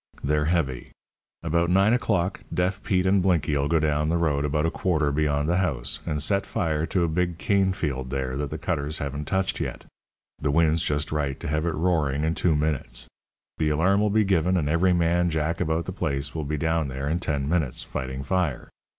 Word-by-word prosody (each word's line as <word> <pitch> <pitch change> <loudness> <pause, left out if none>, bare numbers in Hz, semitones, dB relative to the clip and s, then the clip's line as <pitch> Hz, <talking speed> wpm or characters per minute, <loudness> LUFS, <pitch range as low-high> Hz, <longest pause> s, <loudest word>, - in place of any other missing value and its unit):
They're 75 +1 +1
heavy. 75 -7 -1 0.5
About 85 +1 +1
nine 100 +5 +4
o'clock 100 -6 0
Deaf 95 +2 0
Pete 95 -3 +1
and 95 0 +4
Blinky'll 75 -6 +1
go 85 - +2
down 75 -1 +1
the 85 - +2
road 75 -4 +1
about 75 +2 0
a 80 - +1
quarter 75 -6 0
beyond 75 0 0
the 85 +2 +2
house, 75 -11 -1
and 75 -3 0
set 100 +3 +2
fire 80 -6 -1
to 90 -3 +1
a - - +2
big 85 +1 -1
cane 95 0 +2
field 70 -8 -3
there 65 -1 -2
that 70 +1 -3
the 80 - -4
cutters 75 -2 -2
haven't 70 +1 -4
touched 95 +4 -1
yet. - - -4 0.5
The 70 - -1
wind's 80 +2 +3
just 75 -2 -1
right 70 -3 -1
to - - -6
have 75 +2 0
it 80 - -1
roaring 75 -4 +1
in 80 +1 +1
two 85 -2 +1
minutes. 75 -5 -1 0.5
The 75 - +2
alarm'll 95 +7 +2
be 110 +1 +3
given, 95 -2 +2
and 75 -4 0
every 85 +4 +3
man 85 0 +2
Jack 80 +1 -1
about 80 +1 0
the - - -4
place 70 -6 -2
will 80 -2 -3
be 75 +2 -2
down 80 0 0
there 70 +1 -4
in 80 +3 0
ten 70 -6 -1
minutes, 75 -5 0
fighting 65 +1 -5
fire. 85 -3 -1
80 Hz, 205 wpm, -25 LUFS, 75-90 Hz, 0.5 s, nine